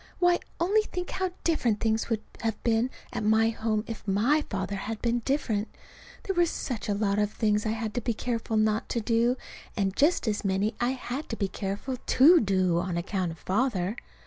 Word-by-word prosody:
Why, 355 -1 +4 0.2
only 395 +6 +3
think 360 -4 -5
how 375 0 -1
different 245 -10 +1
things 220 0 0
would 220 -2 -1 0.2
have 225 -2 -2
been 230 +1 +2 0.2
at - - -2
home 220 0 +2
if 225 -2 -8
my 235 +11 +3
father 195 0 -2
had 215 +3 -4
been 240 0 +1
different! 230 -5 -1 0.6
There 390 - -1
were 345 -1 +3
such 245 -9 -4
a 205 - +1
lot 200 0 +1
of 210 0 +1
things 210 0 +1
I 215 - +1
had 220 -1 -3
to 245 - -1
be 235 0 -1
careful 230 -1 -2
not 215 0 +1
to 235 - 0
do 230 +3 +2 0.4
and 195 -2 0
just 310 -2 +3
as 210 -1 0
many 195 +2 +1
I 245 +2 +2
had 265 +3 -5
to 225 - -2
be 200 -3 -1
careful 200 +7 -4
to 310 +7 +6
do 185 -4 +2
on 180 -1 -2
account 180 0 -1
of - - -14
Father. 200 0 0
225 Hz, 200 wpm, -28 LUFS, 205-250 Hz, 0.6 s, to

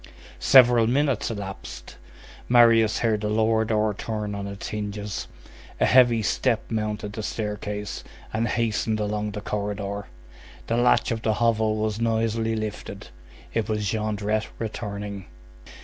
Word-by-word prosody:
Several 120 -3 +6
minutes 135 -1 +1
elapsed. 100 -4 -7 0.5
Marius 115 -3 +5
heard 110 -2 +1
the 105 - -1
lower 110 +1 +2
door 110 -1 +1
turn 105 0 -4
on 100 0 -4
its 100 0 -6
hinges; 105 -2 -4 0.5
a - - +4
heavy 120 -3 +5
step 115 +2 0
mounted 105 -1 -2
the 110 - -4
staircase, 105 -3 -4 0.3
and 115 +1 0
hastened 110 -1 0
along 105 0 -1
the 105 - -5
corridor; 100 -1 -3 0.6
the 115 - -1
latch 120 +1 +3
of 115 -1 -2
the 110 -1 +1
hovel 110 -1 +2
was 110 0 -2
noisily 115 0 0
lifted; 110 -1 -6 0.4
it 115 -1 -1
was 105 -3 0
Jondrette 110 0 -1
returning. 105 -3 -5
110 Hz, 135 wpm, -25 LUFS, 105-115 Hz, 0.6 s, Several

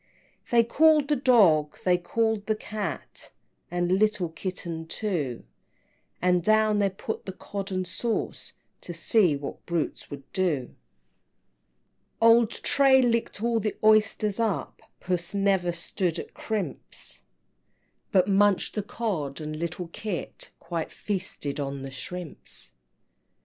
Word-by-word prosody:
XV. - - -19
They 235 -1 +6
called 300 +4 +4
the 295 - +4
Dog, 195 - +4
they 180 -1 +5
called 220 +3 0
the 215 - +2
Cat, 215 -1 -6 0.4
And 175 +2 +1
little 210 -5 +2
Kitten 165 -1 -5
too, 160 - -2 0.8
And 180 0 +3
down 215 +1 +4
they 200 -1 +3
put 195 +3 -6
the - - -2
Cod 195 +1 -6
and 185 0 -1
sauce, 230 +5 -2 0.3
To 175 - -7
see 175 -1 +3
what 140 0 -7
brutes 170 -2 -2
would 140 -1 -8
do. 160 -10 0
XVI. - - -23 1.5
Old 230 0 +6
Tray 265 +1 +4
licked 230 -3 0
all 235 -1 +2
the 215 0 -2
oysters 215 -1 +3
up, 220 -5 -1 0.2
Puss 175 +1 -2
never 195 -3 +2
stood 170 0 -2
at - - -7
crimps, 200 - -4 0.8
But 185 -1 +4
munched 200 -1 +3
the 210 - -1
Cod 195 - -3
and 155 0 -5
little 170 +1 -3
Kit 195 0 -5
Quite 170 -2 -4
feasted 185 -8 -3
on 140 -1 -3
the 135 - -6
shrimps! 145 - -7
190 Hz, 135 wpm, -27 LUFS, 170-215 Hz, 1.5 s, They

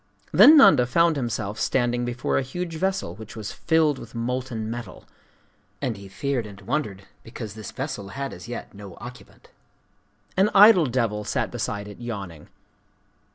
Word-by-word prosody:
Then 310 +2 +8
Nanda 125 - +7
found 165 +6 +3
himself 110 -6 -3
standing 120 -1 0
before 120 0 -1
a - - 0
huge 170 +6 -5
vessel 190 +3 -1
which 110 0 -11
was 110 -2 -6
filled 155 -4 +1
with 115 +1 -12
molten 120 -1 -3
metal;—and 120 +1 -9
he 100 0 -11
feared 120 +4 -2
and 100 -2 -12
wondered 105 -3 -3 0.2
because 115 -3 -8
this 110 0 -8
vessel 130 -7 -5
had 135 +7 -5
as - - -10
yet 120 - -7
no 100 -3 -11
occupant. 125 +3 -12 0.9
An 195 +3 +4
idle 200 -5 +8
devil 115 -4 -1
sat - - -2
beside 105 0 -4
it, 105 - -11
yawning. 100 -10 -7
120 Hz, 155 wpm, -24 LUFS, 105-140 Hz, 0.9 s, Then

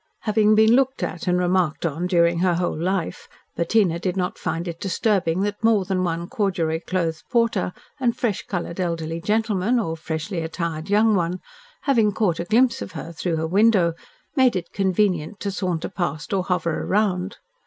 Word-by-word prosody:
Having 215 -1 +3
been 220 +1 +5
looked 265 0 +1
at 225 - -4
and 180 0 +3
remarked 180 -3 +1
on 165 +3 -1
during 170 -2 +3
her 180 -1 +2
whole 175 +1 -1
life, 180 +2 -2 0.3
Bettina 170 -1 +2
did 180 +1 -2
not 180 0 -2
find 165 +2 -3
it 170 -1 -5
disturbing 190 -3 0
that 205 +2 -2
more 220 -4 +3
than 185 -1 0
one 170 -1 -2
corduroy 170 -7 -1
clothed 165 -4 -1
porter 230 -6 +1 0.3
and 240 -3 +1
fresh 220 -6 -1
coloured, 175 -1 -4
elderly 165 -2 -2
gentleman, 215 +2 +1
or 165 -7 -2
freshly 165 +3 -4
attired 165 +1 -4
young 215 +2 +4
one, 180 -1 0 0.4
having 225 -7 +3
caught 185 -7 0
a 170 - -2
glimpse 235 +5 +3
of - - -6
her 165 0 -6
through 165 +1 -2
her 160 0 -1
window, 195 -2 +4 0.4
made 260 -6 +4
it 175 -2 -4
convenient 190 -2 0
to 200 - -2
saunter 180 -4 -2
past 170 -3 -3
or 185 -2 0
hover 175 -3 -1
round. 195 -2 0
185 Hz, 175 wpm, -23 LUFS, 170-210 Hz, 0.4 s, been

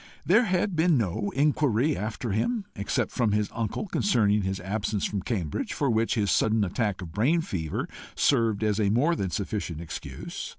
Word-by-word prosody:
There 225 +7 +5
had 185 0 0
been 160 -1 +4
no 100 -1 -1
inquiry 145 -1 +2
after 110 +2 -3
him, 205 - 0
except 100 +1 -1
from 115 -5 +1
his 105 0 0
uncle, 115 - -2
concerning 105 - +2
his 95 0 -2
absence 100 +2 -2
from 100 -2 -2
Cambridge, 90 - -2
for 140 -4 +1
which 115 +2 +1
his 105 -4 +1
sudden 110 -1 +3
attack 100 0 -1
of 85 - -8
brain 130 - +2
fever 80 - -3 0.3
served 115 -6 +2
as 105 0 +1
more 120 +11 +3
than 95 - -2
sufficient 95 -4 -3
excuse. 70 -5 -6
110 Hz, 170 wpm, -27 LUFS, 100-140 Hz, 0.3 s, There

